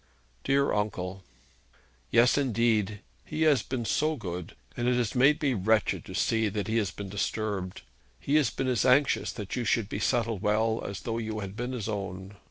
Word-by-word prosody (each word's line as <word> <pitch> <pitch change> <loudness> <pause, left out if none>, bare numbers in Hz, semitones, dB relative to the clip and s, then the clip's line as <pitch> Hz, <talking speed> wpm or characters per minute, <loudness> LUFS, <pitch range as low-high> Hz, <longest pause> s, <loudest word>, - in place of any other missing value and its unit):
'Dear 140 +1 +2
uncle!' 95 -3 -2 0.9
'Yes, 120 +2 +5
indeed. 115 -6 +1 0.2
He 155 +1 -2
has 150 -4 +4
been 125 -3 -4
so 155 +8 +1
good; 90 - -6 0.2
and 120 - -1
it 125 - +3
has 120 -4 0
made 140 +4 +4
me 135 -3 +3
wretched 110 +1 +1
to - - -8
see 110 -1 +1
that 100 -1 -3
he 110 - 0
has 105 -4 +1
been 100 +5 -7
disturbed. 100 -4 -3 0.4
He 140 - -3
has 145 -6 +3
been 135 - -3
as 125 -5 +2
anxious 130 +2 +3
that 105 -3 -5
you 125 - -1
should 115 -2 +1
be 100 - -3
settled 115 -3 0
well, 110 +2 +1
as 100 0 -5
though 115 +1 -3
you 110 -1 -3
had 100 0 -6
been 120 +3 -3
his 115 -5 -4
own. 100 -2 -5
110 Hz, 190 wpm, -28 LUFS, 100-125 Hz, 0.9 s, Yes